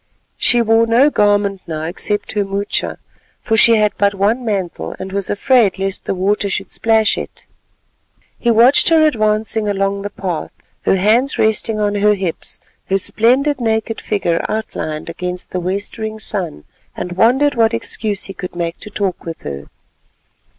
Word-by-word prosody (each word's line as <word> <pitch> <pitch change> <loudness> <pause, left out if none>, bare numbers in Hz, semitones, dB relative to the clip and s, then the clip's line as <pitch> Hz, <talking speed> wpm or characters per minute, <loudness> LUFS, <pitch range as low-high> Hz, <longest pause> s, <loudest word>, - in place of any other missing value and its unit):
She 240 -1 +3
wore 225 +1 +3
no 250 +6 +4
garment 205 -3 +2
now 155 -2 -4
except 205 +5 -3
her 210 -1 0
moocha, 200 +1 -2 0.4
for 225 - 0
she 230 +1 +6
had 210 -1 +3
but 200 0 +2
one 210 +6 +1
mantle 185 - -3
and 190 0 -7
was 200 0 -2
afraid 215 -2 +3
lest 195 0 -3
the - - -1
water 200 +2 0
should - - -3
splash 220 -1 +2
it. - - -9 0.9
He 240 - 0
watched 235 +8 +5
her 320 -1 +5
advancing 215 -4 +1
along 200 0 -1
the 205 - -4
path, 185 -5 -4 0.3
her - - +4
hands 225 +9 +2
resting 220 0 +1
on 205 -1 +1
her 205 +1 +3
hips, 185 -4 -5 0.3
her 195 - +2
splendid 255 +8 +1
naked 220 0 -1
figure 175 -5 -1
outlined 185 -8 -4
against 180 +2 -5
the 185 - -2
westering 205 +4 -4
sun, 185 - -2 0.3
and 180 - -4
wondered 255 +10 +3
what 225 -2 +2
excuse 210 -3 -3
he 195 - -6
could 180 -2 -7
make 170 -1 -3
to 210 - -9
talk 200 -3 -3
with 165 -1 -7
her. 70 0 -6
205 Hz, 165 wpm, -17 LUFS, 190-225 Hz, 0.9 s, she